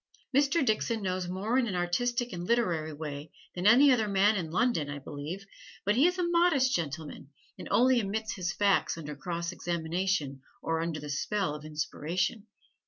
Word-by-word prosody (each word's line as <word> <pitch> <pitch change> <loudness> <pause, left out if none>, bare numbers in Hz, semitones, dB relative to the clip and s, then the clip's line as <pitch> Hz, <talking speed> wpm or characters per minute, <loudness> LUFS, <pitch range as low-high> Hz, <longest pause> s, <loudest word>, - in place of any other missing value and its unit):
Mr. 285 +2 +3
Dixon 220 -1 0
knows 185 -1 -2
more 210 +7 0
in 245 - +1
an 190 - -3
artistic 240 +7 0
and 175 0 -5
literary 175 -10 +1
way 150 0 -7 0.2
than 180 +2 0
any 265 +6 +7
other 225 -4 +2
man 200 +2 +3
in 175 -5 -2
London 170 - +1
(I 145 - -4
believe), 145 +7 -7 0.4
but 205 +1 +2
he 275 +8 +5
is 360 +1 -1
a 355 -1 0
modest 340 -7 +3
gentleman 155 -3 -5 0.3
and - - -7
only 255 +1 +4
emits 220 +1 -2
his 180 -2 -2
facts 200 -4 +2
under 150 -2 -6
cross 170 +2 -4
examination 170 -4 -2 0.2
or 165 0 0
under 165 -2 -3
the 145 0 -6
spell 190 +2 -1
of 150 0 -8
inspiration. 170 +7 -2
185 Hz, 175 wpm, -29 LUFS, 160-235 Hz, 0.4 s, any